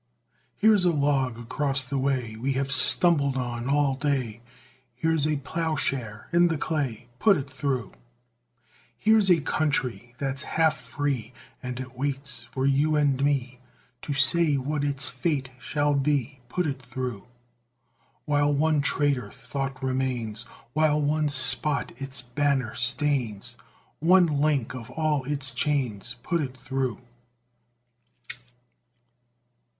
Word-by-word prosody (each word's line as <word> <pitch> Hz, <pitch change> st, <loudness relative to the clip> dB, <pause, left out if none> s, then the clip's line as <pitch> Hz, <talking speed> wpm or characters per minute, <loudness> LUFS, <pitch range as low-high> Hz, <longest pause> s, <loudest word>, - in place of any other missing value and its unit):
Here's 210 Hz, -2 st, +4 dB
a 175 Hz, -, +3 dB
log 140 Hz, -5 st, 0 dB
across 135 Hz, +2 st, -2 dB
the 140 Hz, +1 st, -2 dB
way, 130 Hz, -5 st, -1 dB
We 130 Hz, +5 st, -2 dB
have 135 Hz, +1 st, -2 dB
stumbled 140 Hz, -4 st, +7 dB
on 120 Hz, 0 st, -4 dB
all 145 Hz, -1 st, +2 dB
day; 130 Hz, -5 st, -2 dB, 0.5 s
Here's 160 Hz, +2 st, 0 dB
a 155 Hz, -1 st, 0 dB
ploughshare 140 Hz, -7 st, -3 dB
in 175 Hz, 0 st, +5 dB
the 165 Hz, -2 st, -1 dB
clay, 135 Hz, -7 st, -3 dB
Put 205 Hz, -3 st, +4 dB
it 140 Hz, -1 st, -5 dB
through! 130 Hz, -4 st, -3 dB, 1.1 s
Here's 215 Hz, -, +3 dB
a 170 Hz, -3 st, +4 dB
country 130 Hz, -6 st, -2 dB
that's 135 Hz, 0 st, -2 dB
half 160 Hz, -1 st, +1 dB
free, 135 Hz, -5 st, -4 dB, 0.3 s
And 125 Hz, 0 st, -6 dB
it 130 Hz, 0 st, -8 dB
waits 135 Hz, 0 st, -4 dB
for 130 Hz, 0 st, -2 dB
you 145 Hz, +3 st, +2 dB
and 140 Hz, -2 st, +1 dB
me 130 Hz, -3 st, -1 dB, 0.4 s
To -, -, -6 dB
say 145 Hz, +2 st, +3 dB
what 145 Hz, +2 st, -2 dB
its 140 Hz, 0 st, 0 dB
fate 135 Hz, 0 st, -2 dB
shall 145 Hz, +1 st, -1 dB
be; 140 Hz, -1 st, -1 dB
Put 180 Hz, +6 st, -1 dB
it 140 Hz, -3 st, -4 dB
through! 125 Hz, -3 st, -6 dB, 1.0 s
While 145 Hz, -1 st, +1 dB
one 150 Hz, +1 st, +1 dB
traitor 140 Hz, -2 st, 0 dB
thought 135 Hz, -1 st, -6 dB
remains, 125 Hz, -4 st, -2 dB, 0.3 s
While 155 Hz, -1 st, +2 dB
one 150 Hz, +1 st, 0 dB
spot 140 Hz, +1 st, +5 dB
its 135 Hz, -1 st, +1 dB
banner 130 Hz, -1 st, -1 dB
stains, 125 Hz, -4 st, 0 dB, 0.4 s
One 180 Hz, +3 st, +5 dB
link 145 Hz, -5 st, 0 dB
of 125 Hz, -2 st, -9 dB
all 150 Hz, -1 st, -1 dB
its 135 Hz, -2 st, 0 dB
chains, 125 Hz, -5 st, -2 dB
Put 170 Hz, +2 st, -1 dB
it 130 Hz, -3 st, -5 dB
through! 130 Hz, -2 st, -3 dB
140 Hz, 130 wpm, -25 LUFS, 130-150 Hz, 1.1 s, stumbled